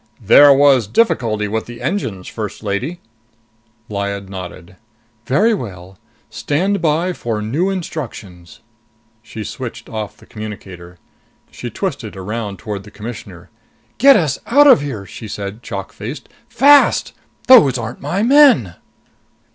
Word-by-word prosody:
"There 145 +7 +8
was 135 -5 +4
a - - -20
difficulty 110 - +1
with 110 +2 -3
the 120 0 -10
engines, 110 - -3
First 110 -1 -6
Lady." 120 - -3 0.9
Lyad 100 -2 -4
nodded. 90 -1 -9 0.5
"Very 215 - +3
well. 95 - -7 0.3
Stand 190 +6 -1
by 165 +3 0
for 115 -8 -4
new 140 - -1
instructions." 115 - -7 0.6
She - - -8
switched - - -7
off 110 -2 -6
the - - -18
communicator. 95 -5 -9 0.5
She - - -7
twisted - - -5
around 100 +1 -5
toward 105 0 -6
the 105 - -13
Commissioner. 100 -6 -10 0.5
"Get 275 +3 +7
us 155 -10 0
out 285 +5 +5
of 265 - +7
here!" 125 -9 -5
she 110 - -10
said, 100 +2 -6
chalk 100 -4 -7
faced. 120 +9 -8 0.2
"Fast! 285 +4 +4 0.3
Those 145 - +7
aren't 120 +1 -6
my 175 +9 -1
men." 255 - +5
115 Hz, 130 wpm, -17 LUFS, 100-160 Hz, 0.9 s, There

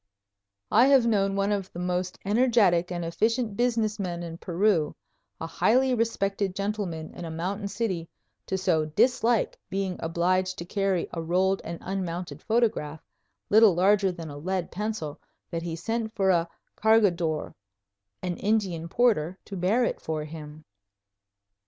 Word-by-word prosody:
I 240 +5 +6
have 270 -3 +5
known 195 -4 +2
one 200 +1 +1
of 195 -2 -2
the - - -10
most 180 +1 -2
energetic 205 -6 +3
and 175 -1 -3
efficient 220 +6 0
business 225 -2 0
men 175 -3 -3
in 165 0 -7
Peru, 175 -3 +1 0.4
a - - -4
highly 255 +10 +2
respected 200 -4 0
gentleman 195 -6 -3
in - - -8
a 165 - -5
mountain 190 +6 -3
city, 195 -6 -3 0.4
so 185 -4 +1
to - - -8
dislike 245 -2 +2
being 190 -2 -2
obliged 185 +3 0
to 170 - -6
carry 195 -1 0
a 165 - -3
rolled 185 +4 +1
and 170 0 -5
unmounted 180 -2 -4
photograph, 215 -10 0 0.5
little 215 -3 +7
larger 195 +2 +3
than 165 -3 -8
a 145 - -8
lead 185 +2 -2
pencil, 210 -7 -4 0.3
that 165 - -2
he 165 -1 -4
sent 225 +5 -3
for 195 -3 +3
a 170 -1 +1 0.3
cargador, 185 -8 +2 0.7
an 180 -1 -2
Indian 190 -6 0
porter, 185 -7 +2
to 200 - -7
bear 195 +7 +2
it - - -1
for 155 -1 -3
him! 155 -1 -10
190 Hz, 150 wpm, -27 LUFS, 170-215 Hz, 0.7 s, little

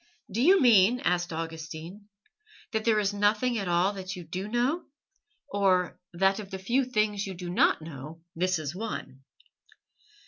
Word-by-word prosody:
"Do 220 +5 -1
you 375 +8 +6
mean," 235 -1 +5
asked 175 0 0
Augustine, 165 +4 -6 0.6
"that 220 -2 -2
there 220 -2 +4
is 205 -1 0
nothing 210 +4 +1
at 195 - -3
all 175 +3 +2
that 190 -1 -6
you 180 - -8
do 185 +5 -5
know, 250 +9 0 0.6
or 185 -3 +1
that 195 +3 +2
of 200 -2 -8
the 190 - -5
few 240 +8 +1
things 215 -4 0
you 190 - -6
do 175 0 -6
not 170 - +3
know 155 +1 -9
this 185 +2 +1
is 155 -1 -4
one?" 185 -9 -6
195 Hz, 165 wpm, -28 LUFS, 175-215 Hz, 0.6 s, you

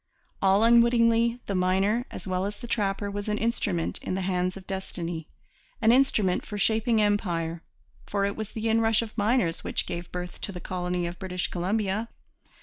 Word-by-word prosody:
All 195 +2 +4
unwittingly, 235 0 +4
the 200 - -2
miner, 195 +6 +2
as - - -8
well 185 0 0
as 205 - -5
the 240 - -9
trapper, 200 -3 -1
was 205 +1 -4
an 210 - 0
instrument 210 -7 -1
in - - -3
the 190 - -1
hands 180 0 0
of 190 - -11
destiny, 175 -4 -5 0.5
an 225 0 +5
instrument 225 -8 +3
for 210 - -6
shaping 220 +2 +2
empire; 175 -6 0 0.5
for 200 -1 0
it 200 - -1
was 220 -1 -5
the 225 0 -2
inrush 225 0 +3
of 220 - -9
miners 210 -5 +1
which - - -1
gave 175 0 -5
birth 180 0 -6
to - - -3
the 180 - -7
colony 180 -1 -2
of 170 0 -5
British 180 -2 -2
Columbia. 200 +4 -1
200 Hz, 180 wpm, -27 LUFS, 180-225 Hz, 0.5 s, an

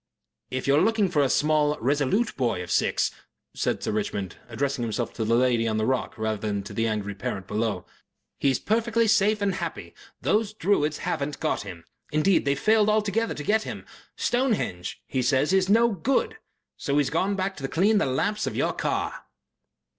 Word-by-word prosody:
"If 130 0 -3
you 140 - +4
are 150 - +4
looking 215 -1 +2
for 150 -4 +2
a 135 - +2
small, 150 0 +2
resolute 145 - +1
boy 115 -8 0
of 90 - -8
six," - - +2 0.4
said - - -1
Sir - - -1
Richmond, 100 -3 -3
addressing 135 +3 -2
himself 115 +1 -2
to 115 - -3
the 115 +2 +2
lady 120 -2 +2
on 110 -1 0
the 110 - +1
rock 130 0 -1
rather 110 -1 -1
than 100 -1 -2
to 100 - -9
the 115 0 0
angry 105 -2 -2
parent 95 -1 -4
below, 105 -3 -2 0.5
"he's 135 -3 +2
perfectly 230 +1 +1
safe 210 0 +3
and 195 -1 +1
happy. - - -5 0.3
The 215 0 0
Druids 155 -7 +1
haven't 150 -5 -3
got 155 - 0
him. 90 -5 -9 0.3
Indeed, 155 +4 +3
they've 140 0 +1
failed 215 -1 +4
altogether 215 +1 +1
to 150 - -6
get 215 +7 +2
him. - - -7 0.3
'Stonehenge,' 225 - -1
he 130 - -1
says, 135 +6 +2
'is 190 0 +3
no 230 +3 +5
good.' 230 +6 0 0.4
So 140 -3 -1
he's 145 -2 +2
gone 190 +5 +1
back 190 0 -2
to 135 -2 -3
clean 200 +8 +3
the - - +1
lamps 210 +11 0
of - - -3
your - - 0
car." - - -2
145 Hz, 190 wpm, -26 LUFS, -, 0.5 s, no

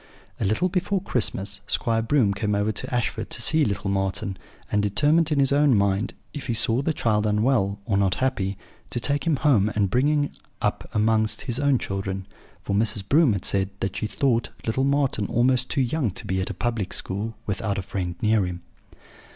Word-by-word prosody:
"A - - 0
little 110 - +2
before 190 +2 0
Christmas, 100 - 0
Squire 115 -1 +1
Broom 115 -4 +2
came 105 +1 -1
over 105 +1 +1
to 105 - -6
Ashford 115 -3 -2
to - - 0
see 155 +6 +4
little 100 -4 -1
Marten, 95 0 -1 0.4
and 105 - +2
determined 150 - +2
in 145 - +2
his 135 0 +3
own 140 -4 +4
mind, 100 +3 0 0.2
if 145 -2 -6
he 120 - 0
saw 115 +3 +1
the 160 - 0
child 110 -7 +1
unwell, 105 -2 +1
or 100 -2 +1
not 100 -2 +2
happy, 100 -7 -1 0.3
to 120 - -2
take 145 +6 0
him 160 - +3
home 125 -8 +3
and 100 -3 +1
bring 130 +4 +3
him 150 -1 +1 0.3
up - - -2
amongst 110 0 +2
his 120 +1 -1
own 140 -2 +3
children; 95 -2 -4 0.4
for 100 - -1
Mrs. 100 -2 +1
Broom 145 -3 +4
had 95 -2 -3
said 95 -1 +2
that 95 0 -2
she 110 - -2
thought 120 -2 0 0.2
little 130 +4 0
Marten 140 -7 +1
almost 125 +1 +2
too 140 - +1
young 130 0 0
to 95 - -7
be 95 0 -1
at 95 - -3
a - - -5
public 115 -5 -2
school, 105 +4 -4
without 100 0 -2
a 95 - -2
friend 90 -2 -4
near 110 -1 +3
him. 90 -1 -7
110 Hz, 200 wpm, -24 LUFS, 100-135 Hz, 0.4 s, see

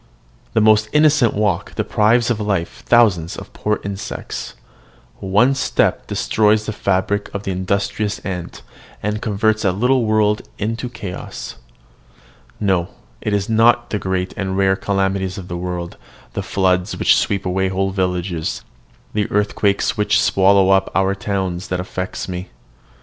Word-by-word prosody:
The 110 - +3
most 110 0 +4
innocent 150 -5 +4
walk 105 -4 -1
deprives 115 +3 +2
of 115 - -1
life 100 -5 -2
thousands 100 -9 +3
of - - -10
poor 105 0 -1
insects: 100 -1 -6 0.6
one 105 +8 +3
step 135 - 0
destroys 110 0 +2
the 110 - -3
fabric 100 +1 0
of 100 - -3
the 95 - -2
industrious 100 +3 -1
ant, 90 -3 -5 0.4
and 105 +1 -2
converts 110 +1 +1
a 95 - +3
little 125 +5 +2
world 110 -1 +2 0.2
into 115 +4 -3
chaos. 100 -7 -7 1.0
No: 95 -4 +1 0.3
it 105 - -2
is 100 -1 0
not 115 +2 +3
the 105 - -1
great 95 -1 -2
and 95 -2 -2
rare 95 -1 +3
calamities 95 -1 -1
of 90 -2 -8
the 85 - -4
world, 90 -1 -5 0.4
the - - -2
floods 90 0 0
which - - +4
sweep 100 -1 0
away 95 +1 0
whole 95 +1 -1
villages, 90 -3 -2 0.5
the 105 -1 0
earthquakes 105 -1 +1
which 105 - +3
swallow 95 0 +4
up 95 0 +3
our 95 0 +2
towns, 95 -1 -3
that 90 -5 -2
affect 90 0 -4
me. 90 0 -5
100 Hz, 145 wpm, -19 LUFS, 95-105 Hz, 1.0 s, most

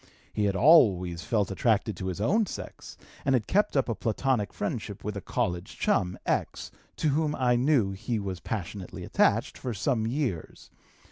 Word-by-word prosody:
He 105 - 0
had 100 -1 +1
always 95 - +5
felt 105 -2 0
attracted 110 0 +1
to 95 - -4
his 95 0 -4
own 200 - +2
sex, - - -8 0.3
and 135 -1 +3
had 115 -4 0
kept 205 -5 +1
up 135 - +2
a 115 - 0
Platonic 115 -2 -1
friendship 105 -1 -4
with 105 0 -4
a 100 - -4
college 90 0 -3
chum, 90 0 +1
X - - -2 0.2
(to 155 - 0
whom 150 +1 +1
I 125 -2 +2
knew 125 -5 +2
he 110 +4 -3
was 95 -3 -4
passionately 95 -1 -5
attached), - - +1
for 125 -3 -4
some 110 +1 0
years. 120 - -3
110 Hz, 175 wpm, -28 LUFS, 95-130 Hz, 0.3 s, always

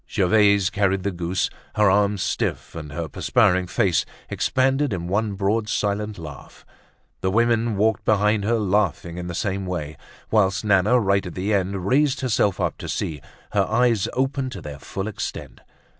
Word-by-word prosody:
Gervaise 100 -1 +3
carried 95 -2 +1
the 100 - 0
goose, 90 +1 -1 0.3
her 105 -1 +4
arms 100 0 +2
stiff, 105 - -2
and 75 -3 -7
her 80 +2 -4
perspiring 90 +5 +2
face 90 0 +1 0.3
expanded 135 0 +1
in 85 -2 -4
one 105 +3 0
broad 105 +2 0
silent 105 0 -1
laugh; 75 -5 -11 0.5
the 95 - 0
women 115 +1 +2
walked 110 +2 +1
behind 105 0 +2
her, 115 +3 +1
laughing 95 -4 0
in 90 - -5
the 85 - -5
same 95 0 -2
way; 80 -5 -4 0.3
whilst 105 -1 +2
Nana, 105 +4 +4
right 100 -3 +1
at 90 - -8
the 100 +3 -1
end, 95 -1 -1
raised 140 +5 +2
herself 105 -6 +1
up - - -1
to - - -6
see, 75 -4 -3 0.3
her - - +2
eyes 120 -5 +2
open 135 0 -1
to 130 - -7
their 70 -2 -8
full 95 +7 -5
extent. 110 - -6
100 Hz, 170 wpm, -23 LUFS, 90-110 Hz, 0.5 s, her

